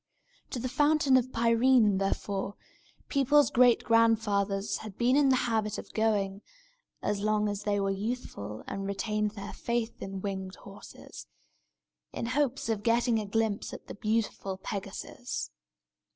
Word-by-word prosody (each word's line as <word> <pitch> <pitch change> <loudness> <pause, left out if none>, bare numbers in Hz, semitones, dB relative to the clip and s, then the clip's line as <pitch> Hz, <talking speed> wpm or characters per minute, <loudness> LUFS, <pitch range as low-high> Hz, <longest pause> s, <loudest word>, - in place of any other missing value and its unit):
To - - -4
the 250 +2 -2
Fountain 290 +1 +3
of 255 0 +2
Pirene, 230 -3 +4
therefore, 195 0 -2 0.5
people's 280 +1 +3
great 245 -1 +5
grandfathers 210 -3 +2
had 215 -3 -9
been 245 +2 +3
in 285 -1 +4
the 260 - +5
habit 220 -2 0
of - - -9
going 205 -3 0 0.6
(as 205 -1 0
long 210 0 +1
as 205 -1 -3
they 205 -1 +1
were 195 0 0
youthful 195 - -4
and 195 0 -4
retained 210 +1 -1
their 200 0 -7
faith 235 -1 -3
in 195 0 -5
winged 190 -1 -4
horses), 200 0 -12 0.8
in - - -4
hopes 265 +1 0
of 220 -3 -1
getting 235 +1 +2
a 210 - -4
glimpse 220 0 -1
at - - -9
the - - -8
beautiful 210 -3 -2
Pegasus. 200 +5 -5
215 Hz, 145 wpm, -29 LUFS, 200-240 Hz, 0.8 s, great